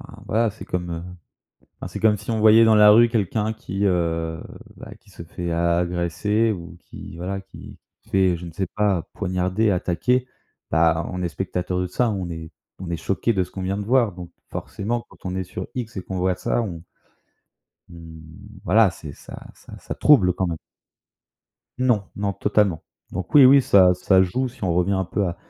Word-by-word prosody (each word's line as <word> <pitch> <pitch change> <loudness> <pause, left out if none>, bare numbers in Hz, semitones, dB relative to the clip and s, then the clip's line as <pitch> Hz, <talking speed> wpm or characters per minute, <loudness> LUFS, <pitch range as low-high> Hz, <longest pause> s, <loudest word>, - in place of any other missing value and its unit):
enfin, - - -13
voilà, 115 +1 +1
c'est 110 - -12
comme, 90 -1 -3
heu, 85 0 -5 0.8
enfin, - - -6
c'est - - -7
comme 105 -1 +3
si 105 +4 -6
on 110 - -1
voyait 110 +1 +6
dans 110 - +5
la 105 -1 +7
rue 115 +2 +6
quelqu'un 110 0 -1
qui, 100 -1 -4
heu, 85 -3 -1 0.3
bah, - - -11
qui 100 - -23
se 90 - -11
fait 85 +1 -6
a 85 0 +1
agresser 90 +6 0
ou 85 -3 -7
qui, - - -11
voilà, 95 +3 -4
qui 95 - -13 0.3
se - - -23
fait, 95 -2 +2
je 90 - -9
ne 85 - -9
sais 95 +4 -3
pas, 100 -5 0
poignarder, 95 +4 0
attaquer, 120 +8 0 0.4
bah, 80 +1 +2
on 90 0 -4
est 85 - -1
spectateurs 90 0 -3
de 90 - -1
ça, 120 +6 0
on 95 -4 -3
est 80 -1 -7 0.3
on 95 - -7
est 85 - -2
choqués 100 +7 -1
de 95 -3 +1
ce - - -12
qu'on 95 - -7
vient 95 +2 -2
de 100 - -4
voir, 120 -4 +2
donc 90 -1 -10 0.2
forcément, 115 +4 -4
quand - - -19
on 90 0 -3
est 95 - -2
sur 90 +1 -7
X 120 -3 -5
et 95 - -3
qu'on 95 - -5
voit 90 0 +1
ça, - - -1
on 85 -6 -7 1.1
on, 85 -1 -11 0.5
voilà, 105 +2 +4
c'est 75 -3 -10
ça - - -11 0.2
ça, - - -14
ça - - -7
trouble 100 -12 +5
quand 95 +1 -2
même. 85 -2 -3 1.2
Non, 120 -6 +2
non, 100 0 -1
totalement. 100 -5 +1 0.3
Donc 90 - -6
oui, 140 -3 +9
oui, 135 +2 +8
ça 95 -6 +5
ça 95 +1 +3
joue, 125 +9 -1
si 120 - -17
on 90 - +1
revient 90 +3 +1
un 95 -1 0
peu 95 +2 -1
à 85 - -4
95 Hz, 205 wpm, -22 LUFS, 85-105 Hz, 1.2 s, oui